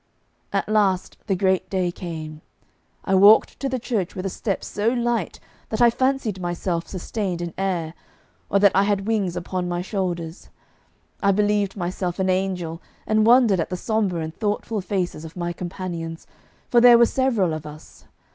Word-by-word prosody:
At - - -1
last 200 -4 +1
the 195 - +1
great 190 0 +1
day 185 -2 0
came. 155 -3 -7 0.6
I 195 - 0
walked 200 +3 +6
to 275 - -2
the 260 - -1
church 225 -7 -2
with 185 - -5
a 195 - -2
step 200 -4 -2
so 210 +2 -3
light 240 -5 -1 0.3
that 220 - -3
I 240 -1 +6
fancied 260 -6 0
myself 175 -1 -2
sustained 185 -1 -3
in 175 -1 -5
air, 175 -5 -2 0.6
or 200 - +3
that 200 -1 +5
I 195 - +4
had 200 -1 0
wings 205 -5 0
upon 180 0 -3
my 175 0 -2
shoulders. 175 -4 -4 0.7
I 200 - +4
believed 205 0 +1
myself 180 0 -3
an 190 -1 +1
angel, 180 -3 -2 0.2
and 215 0 +2
wondered 235 -6 +5
at 165 - -1
the 180 - -3
sombre 200 -4 -1
and 160 0 -6
thoughtful 210 0 -2
faces 180 -4 -3
of 160 +2 -10
my 175 0 -2
companions, 170 -2 -6 0.5
for 240 - +5
there 240 -1 +9
were 235 - +6
several 230 -10 +1
of 155 -1 -6
us. 150 +1 -13
190 Hz, 175 wpm, -23 LUFS, 175-215 Hz, 0.7 s, there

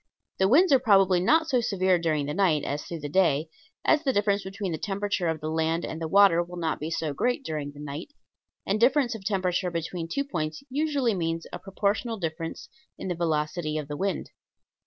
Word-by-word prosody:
The 190 - +4
winds 320 - +5
are 270 - +6
probably 195 -6 +4
not 320 - +3
so 255 -6 +2
severe 185 -4 +2
during 155 -3 0
the 145 - -3
night 170 -6 +2
as 145 +1 -3
through 170 -2 -7
the 145 - -4
day, 155 -2 +2 0.4
as 310 0 +4
the 270 - +2
difference 205 -3 +1
between 190 0 -4
the 160 - -3
temperature 200 -2 -1
of 160 -1 -2
the 155 - -3
land 160 +1 0
and 160 - -6
the 160 - -2
water 195 -1 +5
will 175 +1 -7
not 165 -2 -1
be 155 - -4
so 160 -2 -2
great 245 - -1
during 150 -2 -3
the 145 - -14
night; 150 - -6 0.6
and 205 +2 0
difference 255 +1 +3
of 220 -4 -8
temperature 185 -2 0
between 170 0 -4
two 280 +12 -1
points 155 - -4
usually 280 -4 +1
means 165 -2 -2
a - - -5
proportional 205 +4 -1
difference 165 -2 -5 0.3
in - - -5
the 175 - -1
velocity 155 -1 -1
of 150 -2 -4
the 145 - -5
wind. 190 +1 -2
180 Hz, 210 wpm, -27 LUFS, 160-205 Hz, 0.6 s, are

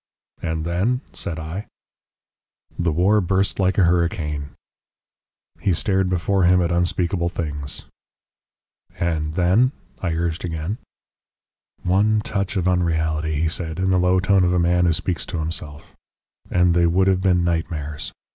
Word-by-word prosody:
"And 80 -1 -2
then?" 100 +10 0
said 80 - -4
I. 80 +6 -5 1.1
"The 85 -1 +1
war 95 +7 +3
burst 95 +2 0
like 95 -1 +2
a 100 - +5
hurricane." 85 -4 0 1.1
He 95 - +1
stared 95 +1 +1
before 95 +2 +1
him 90 +1 +5
at 85 -1 +1
unspeakable 85 0 0
things. 75 -4 -5 1.1
"And 80 -2 -1
then?" 95 +9 +3 0.3
I 85 -3 -1
urged 85 0 -2
again. 85 +5 -3 1.0
"One 105 +4 +3
touch 100 -1 -2
of 90 -1 0
unreality," 80 -3 0
he - - +2
said, 80 -1 -3
in 95 0 +1
the 90 - +3
low 90 +1 +3
tone 95 +1 +3
of 90 0 +2
a - - +2
man 90 +1 +3
who 85 - +3
speaks 85 +1 -2
to - - -4
himself, 80 -2 -6 0.5
"and 90 -1 +3
they 85 0 +3
would 95 +3 +3
have 95 -1 +2
been 90 -2 +3
nightmares. 80 -3 -2
85 Hz, 145 wpm, -22 LUFS, 80-95 Hz, 1.1 s, a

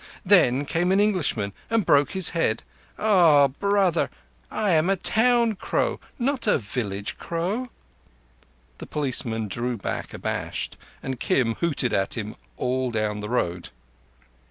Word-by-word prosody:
Then 145 -8 +4
came 175 +5 0
an 195 - +3
Englishman 160 - 0 0.2
and 225 -4 +1
broke 145 -1 +3
his 190 -2 +3
head. 140 -10 0 0.3
Ah, 170 -10 +5
brother, 195 +2 +1 0.4
I 210 -3 0
am 160 +2 +3
a 195 - +3
town 230 +4 +3
crow, 195 - -1 0.2
not 260 -1 -1
a - - +4
village 105 -3 -4
crow!" 190 +10 -3 1.1
The - - -8
policeman 120 -6 -2
drew 120 +4 -2
back 100 - -4
abashed, - - -4 0.3
and 130 -2 -4
Kim 115 -4 +1
hooted 145 -7 0
at 95 +4 0
him 110 -1 -5 0.2
all 130 0 -1
down 105 -2 -1
the 105 0 -5
road. 90 -8 -1
145 Hz, 135 wpm, -24 LUFS, -, 1.1 s, Ah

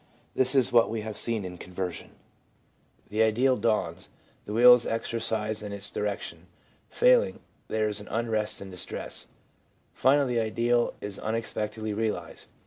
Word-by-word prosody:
This 130 +1 +2
is 130 -1 +4
what 115 -1 +5
we 115 -1 -3
have 110 0 -6
seen 115 -4 -1
in 90 -1 -8
conversion. 90 -1 -5 1.0
The 105 +2 0
ideal 120 +4 +3
dawns; 105 -6 -1 0.4
the 105 - -5
will 125 +2 +9
is 125 -1 +2
exercised 110 -1 -2
in 105 -1 -6
its 100 0 -4
direction; 105 -1 -4 0.4
failing, - - +3 0.3
there 110 0 0
is 105 -1 -4
unrest 110 -1 -1
and 95 -1 -8
distress; 90 - -4 0.7
finally 135 -2 +3
the - - +3
ideal 120 +2 +1
is 100 -1 -6
unexpectedly 110 -1 -3
realised. 110 0 -3
110 Hz, 140 wpm, -27 LUFS, 105-120 Hz, 1.0 s, will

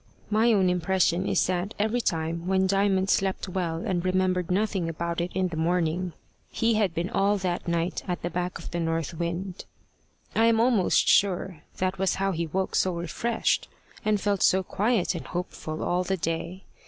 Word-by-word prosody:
My 220 +3 +4
own 195 -4 +3
impression 180 +1 +1
is - - +2
that 185 +3 -2
every 220 +4 +1
time 165 -2 -2
when 190 0 +2
Diamond 195 0 +2
slept 190 0 0
well 175 -3 -2
and 175 -3 -1
remembered 185 -1 +1
nothing 190 -2 0
about 170 +1 -2
it 175 +1 -3
in 185 -1 +1
the 160 - -5
morning, 170 +1 0 0.4
he 230 0 +1
had 205 -6 +1
been 170 +2 -1
all 200 +1 +2
that 180 -2 -2
night 170 +1 -1
at 180 -1 -3
the 175 - -2
back 180 0 -2
of - - -9
the 175 - -2
north 165 -1 -1
wind. 170 +3 -4 0.7
I 225 - +4
am 230 -1 +4
almost 230 -5 +3
sure 190 -4 +2 0.2
that 185 0 -1
was 190 0 +1
how 195 0 0
he 170 -2 -2
woke 190 +4 -2
so 185 -2 +2
refreshed, 175 +8 -1 0.4
and 215 -1 +2
felt 200 -1 0
so 190 +1 +4
quiet 205 +1 +1
and 170 - -6
hopeful 165 -3 -4
all 180 +1 +1
the 190 +1 -1
day. 170 +3 -3
185 Hz, 185 wpm, -26 LUFS, 170-195 Hz, 0.7 s, My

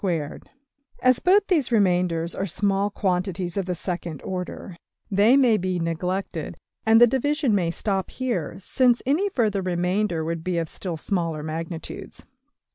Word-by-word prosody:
png}% 165 -7 -2 0.6
As 255 -1 +5
both 395 +3 +4
these 310 -11 +1
remainders 180 -5 +2
are 195 - -2
small 195 +2 +1
quantities 185 -2 -1
of 195 -2 -2
the 180 - -1
second 170 -3 -4
order, 180 0 -5 0.4
they 210 +7 +5
may 245 -5 +5
be 185 -1 -1
neglected, 180 +4 -3 0.3
and 225 0 +7
the 240 - +9
division 270 +1 +1
may 180 -4 +2
stop 195 +2 -2
here, 240 - -3
since 245 +5 +2
any 320 +10 +2
further 215 - 0
remainders 180 -1 0
would 165 0 -3
be 180 -1 -1
of 165 -2 -1
still 175 -4 -5
smaller 165 -3 -2
magnitudes. 160 +1 -6
190 Hz, 150 wpm, -24 LUFS, 170-225 Hz, 0.6 s, the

